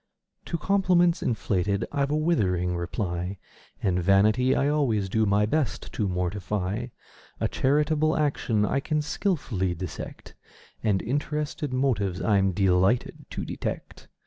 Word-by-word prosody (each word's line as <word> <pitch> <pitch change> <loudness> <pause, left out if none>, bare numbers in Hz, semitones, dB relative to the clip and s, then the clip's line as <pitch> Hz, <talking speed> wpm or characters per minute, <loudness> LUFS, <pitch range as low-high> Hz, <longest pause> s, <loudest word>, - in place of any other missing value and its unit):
To 170 - -2
compliments 180 -1 +3
inflated 100 -3 0
I've 140 -1 0
a 150 - +1
withering 90 - +1
reply; 90 +1 -3 0.5
And 90 -2 +1
vanity 105 +8 +4
I 140 - +2
always 130 -10 +1
do 110 +2 +2
my 100 +1 +3
best 150 +4 -2
to 105 - -1
mortify; 95 +4 -2 0.5
A - - +1
charitable 150 +3 +1
action 125 -8 +1
I 140 - +1
can 150 +2 -1
skilfully 135 - -1
dissect: 90 0 -7 0.5
And 105 -4 +1
interested 145 +3 -2
motives 110 -9 0
I'm 100 -3 +2
delighted 95 +4 +1
to - - -5
detect. - - -5
110 Hz, 125 wpm, -26 LUFS, 95-145 Hz, 0.5 s, vanity